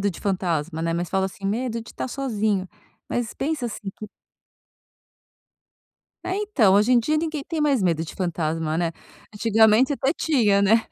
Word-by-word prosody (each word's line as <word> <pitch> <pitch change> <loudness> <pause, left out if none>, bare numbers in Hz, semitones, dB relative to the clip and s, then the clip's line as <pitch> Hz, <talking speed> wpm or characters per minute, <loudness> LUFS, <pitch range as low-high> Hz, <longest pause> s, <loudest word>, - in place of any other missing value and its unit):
de 200 -3 -2
fantasma, 170 -5 -1
né, 165 0 0
mas 175 +1 -2
falo 190 -1 0
assim, 195 +1 -7
medo 230 +2 -1
de 225 - -12
tá - - -4
sozinho, 215 -8 -1 0.4
mas 240 -2 -2
pensa, 290 -3 -2
assim, 210 -3 -6
que 215 - -7 2.2
É, 365 - -1
então, 340 - +3
hoje 205 +4 +4
em 250 - +6
dia 305 +7 +1
ninguém 310 -3 -3
tem 325 -2 -3
mais 280 -7 +2
medo 165 -3 +1
de 165 - -7
fantasma, 165 -3 -1
né. 170 -1 0 0.4
Antigamente 220 +4 +4
até 270 0 0
tinha, 220 -13 +2
né. 220 +3 +3
215 Hz, 165 wpm, -24 LUFS, 185-260 Hz, 2.2 s, em